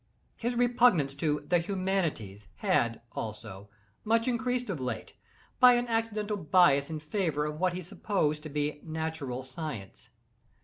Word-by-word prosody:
His 240 Hz, +1 st, -2 dB
repugnance 240 Hz, -, +3 dB
to 150 Hz, 0 st, -1 dB
"the 175 Hz, +1 st, +4 dB
humanities" 170 Hz, -, -2 dB
had, 120 Hz, -, +1 dB
also, 105 Hz, -2 st, -7 dB, 0.3 s
much 230 Hz, +2 st, +2 dB
increased 250 Hz, +1 st, 0 dB
of 165 Hz, -, -4 dB
late, 125 Hz, -3 st, -4 dB, 0.5 s
by 250 Hz, -1 st, +9 dB
an 245 Hz, 0 st, +1 dB
accidental 220 Hz, -2 st, -1 dB
bias 155 Hz, -4 st, +4 dB
in 160 Hz, -1 st, -4 dB
favor 155 Hz, -2 st, -1 dB
of 150 Hz, 0 st, -4 dB
what 185 Hz, -1 st, +2 dB
he 180 Hz, +1 st, -5 dB
supposed 155 Hz, -4 st, -1 dB
to 155 Hz, -, -8 dB
be 150 Hz, 0 st, -2 dB
natural 160 Hz, -5 st, -4 dB
science. 130 Hz, -, -7 dB
160 Hz, 140 wpm, -29 LUFS, 140-210 Hz, 0.5 s, by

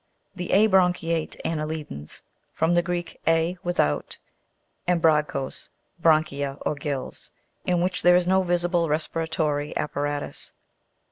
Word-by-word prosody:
The 180 Hz, -1 st, -4 dB
abranchiate 180 Hz, -5 st, +3 dB
anne'lidans 155 Hz, -, -4 dB, 0.3 s
(from 165 Hz, +2 st, +2 dB
the 175 Hz, -, +4 dB
Greek, 175 Hz, 0 st, -4 dB
a, 165 Hz, +2 st, +3 dB
without, 75 Hz, -, 0 dB, 0.7 s
and 180 Hz, -1 st, +3 dB
bragchos, 150 Hz, -4 st, +1 dB, 0.3 s
branchia, 145 Hz, -4 st, +2 dB
or -, -, 0 dB
gills), 140 Hz, -3 st, -5 dB, 0.4 s
in 180 Hz, -1 st, +2 dB
which 180 Hz, +1 st, 0 dB
there 175 Hz, 0 st, +6 dB
is 180 Hz, 0 st, +3 dB
no 190 Hz, +1 st, +3 dB
visible 175 Hz, -2 st, +1 dB
respiratory 155 Hz, -1 st, -1 dB
apparatus. 145 Hz, 0 st, -3 dB
165 Hz, 115 wpm, -25 LUFS, 150-175 Hz, 0.7 s, there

